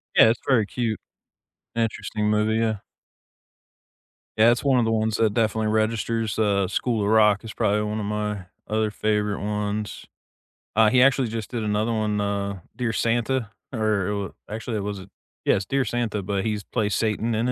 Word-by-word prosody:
Yeah, 110 - +8
it's 115 - +1
very 120 -6 +4
cute. 115 0 -2 0.8
Interesting 110 -2 -1
movie, 105 +1 +2
yeah. 110 -1 +1 1.6
Yeah, 115 +2 +6
it's 120 - 0
one 135 -3 +4
of 115 - +2
the 115 - +1
ones 110 0 +1
that 110 -2 +2
definitely 110 -1 +1
registers. 110 0 0
Uh, 100 -3 +2
School 110 +4 0
of 100 - 0
Rock 105 -1 +4
is 115 - -7
probably 105 +1 +1
one 105 +1 -2
of 105 - -3
my 105 -2 -2 0.2
other 110 0 0
favorite 105 -1 0
ones. 105 0 -3 0.7
Uh, 110 0 +6
he 125 +2 +4
actually 130 -1 +4
just 110 -1 -5
did 115 -3 -2
another 105 +2 0
one, 105 -1 0
uh, 100 -1 -2 0.2
Dear 120 -3 -1
Santa, 115 0 0 0.2
or, 105 -3 0
uh, 105 - -13
actually 110 0 -3
it - - -2
was 100 -2 -5 0.4
yes, 95 - +2
Dear 135 +3 0
Santa, 115 -4 -1
but 100 +1 -2
he's 105 -2 -1
played 105 -4 -1
Satan 110 +2 0
in 115 +3 0
it, - - +1
110 Hz, 180 wpm, -24 LUFS, 105-115 Hz, 1.6 s, Yeah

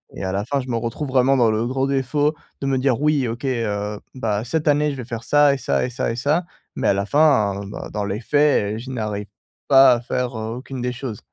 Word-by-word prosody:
et - - -6
à 95 - -2
la 100 +2 -2
fin, 140 +3 -1
je 130 - -9
me 115 - 0
retrouve 115 +5 -4
vraiment 130 +1 +3
dans 120 -4 +4
le 110 +2 0
gros 135 +2 0
défaut 140 +3 +1 0.3
de 135 - -2
me 135 -1 +1
dire: 130 0 +1
«Oui, 150 -4 +2
OK, 115 +3 -5
heu, 105 -5 -2
bah, 110 -4 -2
cette 155 +5 -2
année, 150 +1 +2
je - - -5
vais 125 - -5
faire 115 -1 -6
ça 145 -1 +5
et - - -2
ça 130 - 0
et - - -3
ça 125 -1 -2
et - - -3
ça», 150 +8 0 0.3
mais - - 0
à - - +4
la 100 0 -1
fin, 125 -7 +3
bah, 100 - -7
dans 105 -1 -2
les 100 +3 -3
faits, 140 -6 +2
je 125 +3 -9
n'arrive 105 -4 -3 0.4
pas 135 -1 +7
à 120 - 0
faire, 125 -1 -3
heu, 110 +1 -4
aucune 130 +1 -7
des 125 0 -2
choses. 120 -4 -6
125 Hz, 255 wpm, -21 LUFS, 110-140 Hz, 0.4 s, pas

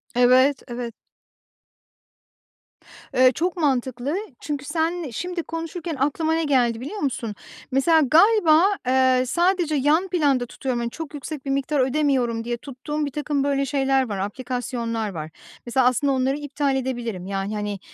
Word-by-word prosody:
Evet, 255 +3 +4
evet. 240 -1 -5 2.2
Eee, 255 0 +6
çok 355 +2 -1
mantıklı. 265 -2 0 0.2
Çünkü 285 -2 -4
sen 325 +1 -1
şimdi 350 +8 -4
konuşurken 330 0 -5
aklıma 315 +3 +1
ne 325 0 +1
geldi 245 -5 +2
biliyor 400 +11 -6
musun? 230 -6 -2 0.4
Mesela 315 +5 +4
galiba, 330 - +5 0.2
eee, 260 0 +4
sadece 345 +2 +1
yan 300 +7 +2
planda 290 -9 +1
tutuyorum, 245 0 -3
hani, 235 - -2
çok 320 +4 -8
yüksek 290 0 -7
bir 275 - -4
miktar 275 +1 0
ödemiyorum 255 -4 +1
diye 240 0 -3
tuttuğum 295 +4 -4
birtakım 285 0 -2
böyle 275 -1 +1
şeyler 270 -2 +1
var, 200 - -3
aplikasyonlar 230 +1 -3
var. 160 -4 -6 0.4
Mesela 245 +1 +2
aslında 270 +3 +2
onları 265 +2 +1
iptal 285 -1 -1
edebilirim. 240 -8 -3
Yani, 195 +1 -3
hani, 205 -2 -3
270 Hz, 140 wpm, -23 LUFS, 245-305 Hz, 2.2 s, Eee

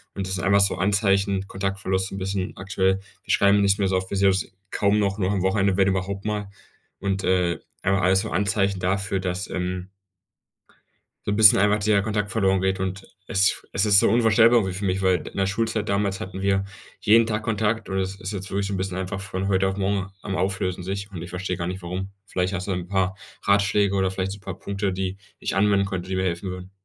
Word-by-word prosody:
Und 95 -1 -3
das 95 - -2
sind 95 - -4
einfach 100 +1 +4
so 100 -1 +3
Anzeichen, 100 0 +1
Kontaktverlust 95 -1 -2
so - - -7
'n - - -5
bisschen 95 0 -3
aktuell. 95 0 0 0.2
Wir - - -3
schreiben 100 0 +4
nicht 100 0 +3
mehr 100 - +2
so 95 - +1
oft, 95 0 -4
wir 100 - -2
sehen 100 0 +4
uns 95 -2 -1 0.2
kaum 100 0 +2
noch, 100 0 0
nur 95 +1 +1
am 95 -3 0
Wochenende, 95 0 +2
wenn 100 0 +4
überhaupt 95 +1 -1
mal. 105 -2 -2 0.5
Und, 95 0 -2
äh, 90 -2 +1 0.2
einfach 95 0 +1
alles 95 +1 +4
so - - -4
Anzeichen 100 +1 +1
dafür, 95 +1 -1
dass, 90 +1 -3
ähm 90 0 -3 1.4
so - - +1
'n - - +1
bisschen 105 -2 +7
einfach 105 +1 +4
der 100 -1 +3
Kontakt 105 -1 -2
verloren 95 -3 +2
geht. 95 0 0
Und 95 +1 -3 0.2
es 95 -1 +2
es 100 +2 +2
ist 100 -1 +7
so - - +4
unvorstellbar 115 +1 +5
irgendwie 95 -3 -2
für 100 +2 -4
mich, 95 +1 0
weil 95 -1 +4
in - - -9
der 95 - +2
Schulzeit 110 +1 -1
damals 100 -1 0
hatten 95 +1 -6
wir 95 0 +1 0.3
jeden 115 +2 +5
Tag 105 -1 -2
Kontakt 110 0 -1
und 95 0 -1
es 95 +1 -3
ist 95 - -4
jetzt 95 -1 -5
wirklich 100 0 -1
so 100 - -3
'n - - -1
bisschen 95 -1 -3
einfach 95 +1 -4
von 95 -1 -3
heute 95 -1 +2
auf 95 +1 -2
morgen 95 -1 -1
am 95 -2 -3
Auflösen 95 -1 -1
sich 100 +2 -4
und 85 -4 -7
ich 85 - -7
verstehe 90 0 -3
gar 85 - -3
nicht, 90 0 -5
warum. 95 +2 -4 0.2
Vielleicht 95 0 -1
hast 90 +1 -3
du 100 - -1
'n 90 -1 -3
paar 95 -1 0 0.3
Ratschläge 100 0 +3
oder 95 -1 +2
vielleicht 95 0 -3
so 100 - -6
'n - - -23
paar - - -7
Punkte, 100 -1 -2
die 95 0 -3 0.2
ich - - -3
anwenden 100 0 +3
könnte, 95 -2 -4
die 95 - -1
mir 95 - 0
helfen 90 +1 -2
würden. 90 +1 -8
95 Hz, 235 wpm, -24 LUFS, 95-100 Hz, 1.4 s, bisschen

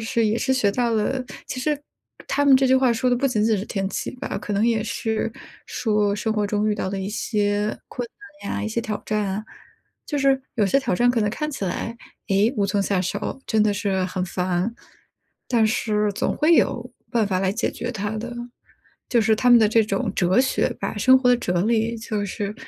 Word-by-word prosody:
是 230 -1 +1
也 215 +2 +1
是 265 - +1
学 250 -6 +2
到 240 +3 0
了 255 +4 0 0.2
其 - - -5
实 295 +2 0 0.5
他 285 - +1
们 275 -2 +7
这 265 - +3
句 260 0 +5
话 260 -2 +3
说 235 +2 0
的 245 - +3
不 275 +3 +1
仅 215 -5 +1
仅 220 -1 +3
是 195 - -3
天 195 -3 -2
气 - - -3
吧， - - -4
可 210 - -5
能 205 +2 +2
也 225 -2 +1
是 220 0 -2 0.3
说 210 -3 0
生 220 +2 -1
活 210 -1 0
中 210 +1 0
遇 - - +1
到 200 - -3
的 195 - -3
一 190 - -3
些 210 -1 -1
困 245 -1 -5 0.4
难 - - -3
呀， - - -2
一 220 - -2
些 225 +2 -1
挑 215 -2 -4
战 215 -1 0
啊。 195 +2 -3 0.6
就 295 - -2
是 270 -1 +3
有 215 - +2
些 235 +8 +3
挑 245 -8 0
战 245 +6 +3
可 240 -2 +1
能 210 - +1
看 300 +7 -3
起 270 -8 -4
来， 230 +5 -3 0.3
哎 200 +5 +3
无 200 - +2
从 200 +1 0
下 195 -1 0
手， 185 +8 -3
真 220 -2 +2
的 210 -1 +2
是 190 -1 0
很 180 0 -2
烦， 180 +3 -1 0.7
但 230 -3 +3
是 210 -1 0
总 - - -1
会 320 +3 +4
有 245 -5 +1 0.2
办 225 -3 +2
法 185 -2 0
来 190 0 +1
解 230 - -1
决 240 +1 -5
它 205 -2 -3
的。 240 +3 -5 0.8
就 240 -2 +4
是 220 0 +3
他 250 +3 +3
们 240 - +9
的 220 - +4
这 220 0 +4
种 230 +1 -1
哲 185 +6 +3
学 260 -1 +1
吧， - - -3
生 260 +5 +6
活 255 -1 +2
的 245 - +5
哲 180 -7 -1
理， 225 +1 +1
就 215 -2 -3
是 200 +1 -4
220 Hz, 245 characters per minute, -23 LUFS, 205-245 Hz, 0.8 s, 们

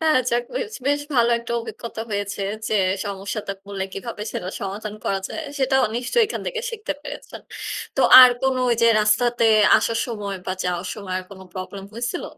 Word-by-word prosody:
হ্যাঁ 315 -1 +3
আচ্ছা 245 -1 0 0.2
বেশ, 470 -3 -3
বেশ 285 +1 +2
ভালো 235 -1 +4
একটা 235 0 -6
অভিজ্ঞতা 230 0 -7
হয়েছে 200 0 -3 0.3
যে - - 0 0.3
সমস্যাতে 200 +1 -4
পরলে 195 -1 -4
কীভাবে 210 +1 -6
সেটা 180 - -4
সমাধান 205 +2 -5
করা 195 - 0
যায়, 320 - -5 0.2
সেটাও 265 0 +3
নিশ্চয়ই 250 - +2
এখান - - -5
থেকে 480 -2 -2
শিখতে 430 -7 -4
পেরেছেন। - - -8 0.6
তো - - +2 0.2
আর 255 - +10
কোন 265 -1 +2 0.3
যে - - +6
রাস্তাতে 230 +3 +2 0.3
আসার 230 0 0
সময় 205 -4 -4
বা 185 - -1
যাওয়ার 180 0 -2
সময় 200 -4 -6
আর 185 - -7
কোন 190 -1 -11
প্রবলেম 195 +1 -6
হয়েছিল? 240 +9 -3
225 Hz, 175 wpm, -22 LUFS, 200-255 Hz, 0.6 s, আর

